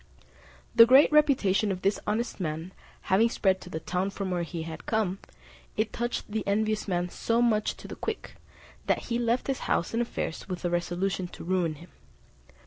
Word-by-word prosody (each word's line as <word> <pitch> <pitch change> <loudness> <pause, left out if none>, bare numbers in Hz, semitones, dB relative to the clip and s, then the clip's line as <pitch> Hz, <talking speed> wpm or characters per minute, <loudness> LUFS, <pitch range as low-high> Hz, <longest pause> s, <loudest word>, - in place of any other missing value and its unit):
The 230 0 +9
great 265 +5 +7
reputation 230 -10 +3
of 185 -1 -4
this 195 +1 +2
honest 225 +2 -1
man 165 +1 -4 0.3
having 210 +4 +3
spread 190 -4 +1
to 180 - -10
the 160 - -4
town 180 +4 -1
from 195 -1 -4
whence 175 -2 -2
he 165 -3 -4
had 160 0 -8
come, 205 -4 0 0.6
it 215 0 0
touched 240 -2 -3
the 220 -1 -1
envious 215 +1 0
man 175 -2 0
so 230 +6 0
much 220 -3 +2
to - - -10
the - - -7
quick, - - -5 0.5
that - - 0
he 235 - +1
left 235 +1 +1
his 270 -1 -1
house 170 - +1
and 230 - +1
affairs 220 -6 -4
with 180 -1 -4
a 175 - 0
resolution 180 +2 -1
to - - -10
ruin 175 -3 0
him. 170 +4 -14
195 Hz, 190 wpm, -28 LUFS, 180-230 Hz, 0.6 s, The